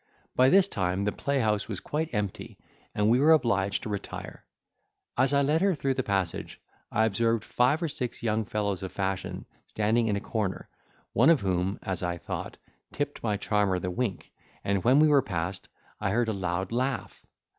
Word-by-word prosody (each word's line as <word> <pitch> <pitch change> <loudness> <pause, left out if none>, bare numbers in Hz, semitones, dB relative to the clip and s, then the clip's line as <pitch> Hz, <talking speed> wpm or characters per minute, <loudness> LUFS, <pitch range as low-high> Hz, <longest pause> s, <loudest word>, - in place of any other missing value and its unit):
By 130 +1 +5
this 195 +3 +6
time 95 - -1
the 105 - +1
playhouse 110 -8 0
was 100 -5 -4
quite 160 +2 -3
empty, 105 -3 -4 0.4
and 105 0 +2
we 120 +3 +4
were 155 +3 +6
obliged 100 -9 +1
to - - -4
retire. 100 -1 -6 0.7
As 130 +2 +3
I 140 0 +3
led 150 +4 +2
her 195 -2 +3
through 135 -2 0
the 130 - -1
passage, 95 -7 -2 0.3
I 110 - +3
observed 115 +1 +1
five 135 +7 +2
or - - +1
six 125 -6 -5
young 110 -1 +1
fellows 100 -2 -2
of 95 - -5
fashion 95 -1 -3 0.2
standing 110 +2 +1
in 105 - +1
a - - -1
corner, 105 -3 -3 0.4
one 125 +8 +5
of 165 -5 +5
whom, 95 0 0
as 95 -1 -3
I 90 -1 -2
thought, - - -6 0.3
tipped - - -3
my 105 -3 0
charmer 100 -2 +1
the 90 0 -3
wink, 110 -1 -3 0.3
and 100 -2 0
when 130 +3 +5
we 155 +1 +6
were 145 -2 +5
passed, 90 -5 -4 0.3
I 105 - 0
heard 115 +3 +1
a - - 0
loud 95 0 -2
laugh. 130 +2 -2
105 Hz, 190 wpm, -28 LUFS, 95-130 Hz, 0.7 s, this